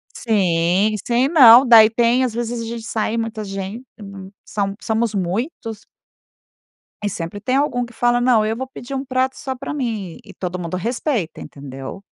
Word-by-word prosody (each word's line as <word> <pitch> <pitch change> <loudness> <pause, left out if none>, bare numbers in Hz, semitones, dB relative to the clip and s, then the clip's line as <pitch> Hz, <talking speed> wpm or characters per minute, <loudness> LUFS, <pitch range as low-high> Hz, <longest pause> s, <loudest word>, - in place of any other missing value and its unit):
Sim. 190 -1 +1
Sei 245 +2 +2
não. 260 -5 +8
Daí 225 -2 +8
tem 235 +3 +2
às 245 - -1
vezes, 235 0 -3
a - - -5
gente 230 0 -6
sai 220 +1 -2
muita 225 -1 -3
gente 195 +5 -6 0.6
são 200 -1 -2
somos 225 -1 -1
muitos. 210 - -3 1.2
E 205 - 0
sempre 170 +1 -6
tem 255 +5 -1
algum 260 -3 0
que 235 - -15
fala; 240 +1 +2
"Não, 245 -3 +3
eu 220 +1 -1
vou 260 - -3
pedir 260 0 -8
um 270 +1 -3
prato 260 0 -1
só 265 -1 -5
pra 275 +3 -6
mim". 220 - -4
E - - -14
todo 180 -1 -5
mundo 175 0 -4
respeita, 235 - -2
entendeu? 135 +4 -9
225 Hz, 175 wpm, -20 LUFS, 195-245 Hz, 1.2 s, não